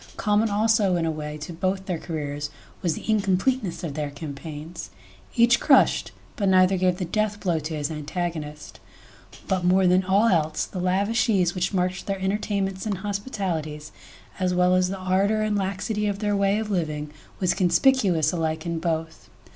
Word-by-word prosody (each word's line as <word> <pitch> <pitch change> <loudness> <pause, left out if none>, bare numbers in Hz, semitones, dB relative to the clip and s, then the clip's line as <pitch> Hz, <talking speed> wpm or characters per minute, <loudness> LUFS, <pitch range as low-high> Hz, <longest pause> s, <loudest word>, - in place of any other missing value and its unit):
..Common 210 +1 +2
also 210 -2 +2
in 170 -1 0
a 160 - 0
way 150 -1 -5
to 155 +3 -7
both 190 +3 -2
their 180 -4 -2
careers 145 -3 -4 0.3
was 170 -3 0
the - - -9
incompleteness 205 0 +1
of 160 -4 -3
their 150 0 -3
campaigns. 150 - -7 0.5
Each 235 +1 +5
crushed, 275 - +4 0.2
but 200 -3 +1
neither 185 0 +5
gave 180 -1 +1
the 185 - -2
death 210 +3 -1
blow 175 -5 0
to 155 +1 -5
his 150 0 -2
antagonist. 155 -1 -5 0.7
But 185 -2 0
more 185 +1 +4
than 180 +1 +4
all 195 +4 +3
else, 160 -7 +1
the 185 - -7
lavish 200 +7 +1
ease 180 -5 +2
which 180 -1 -1
marked 185 -1 -1
their 195 -1 -2
entertainments 195 0 -1
and 200 -3 -1
hospi 205 +4 -4
talities, 155 - -3 0.5
as 180 -1 +1
well 180 0 +4
as 185 0 +3
the 195 - -4
ardour 195 +3 +1
and 215 -1 0
laxity 200 +2 -1
of 200 -1 -1
their 205 0 0
way 200 +1 +2
of 215 -1 -3
living, 150 -5 -2 0.3
was 185 -2 +2
conspicuous 180 - +3
alike 160 -2 -2
in 170 -1 -2
both. 160 -1 -3
185 Hz, 180 wpm, -25 LUFS, 160-200 Hz, 0.7 s, Each